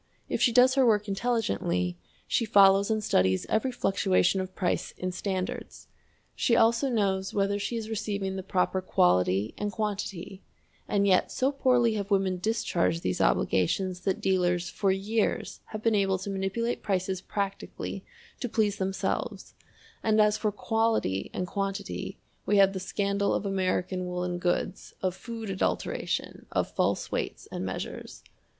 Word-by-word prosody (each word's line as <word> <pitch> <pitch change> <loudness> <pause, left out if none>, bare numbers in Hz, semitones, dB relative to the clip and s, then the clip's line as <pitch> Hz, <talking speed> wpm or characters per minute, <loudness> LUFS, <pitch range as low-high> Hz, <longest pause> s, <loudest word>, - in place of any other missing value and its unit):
If - - -2
she 245 - +5
does 250 +2 +6
her 270 0 +4
work 215 -3 +3
intelligently, 195 - 0 0.3
she - - +1
follows 200 -1 +5
and 215 -1 0
studies 95 - +2
every 255 +4 +1
fluctuation 190 -4 +2
of 185 0 -7
price 180 -2 -1
in 185 0 -2
standards. 185 0 -4 0.4
She 235 - +2
also 230 +4 +3
knows 195 -5 0
whether 200 0 +1
she 235 - -3
is 220 -1 -4
receiving 200 -3 -2
the 190 - -3
proper 185 0 0
quality 90 - +2
and 205 0 -1
quantity; 200 -3 -4 0.5
and 200 -1 +2
yet 185 -2 +3
so 265 +2 +1
poorly 250 -4 +3
have 205 -2 -3
women 190 -2 +1
discharged 175 -5 0
these 90 - -1
obligations 180 - +1
that 190 +1 -1
dealers 180 -2 +1
for 200 - 0
years 205 +3 -1
have 215 0 -7
been 230 - +3
able 195 -2 +2
to 190 +2 -5
manipulate 195 +5 -2
prices 190 -2 -1
practically 200 0 -4 0.4
to 245 - -3
please 210 -3 +1
themselves, 190 0 -2 0.5
and 220 -1 +2
as 210 0 +5
for 215 -1 0
quality 220 - 0
and 180 - -2
quantity 195 +1 -4 0.3
we 205 - +3
have 195 0 +6
the 190 - -3
scandal 200 +1 0
of - - -2
American 185 -1 -1
woolen 180 0 -2
goods, 175 +1 -2
of 185 -1 0
food 225 -3 -6
adulteration, 190 - -2
of - - 0
false - - 0
weights - - -3
and - - -4
measures. - - -6
195 Hz, 155 wpm, -28 LUFS, 185-215 Hz, 0.5 s, does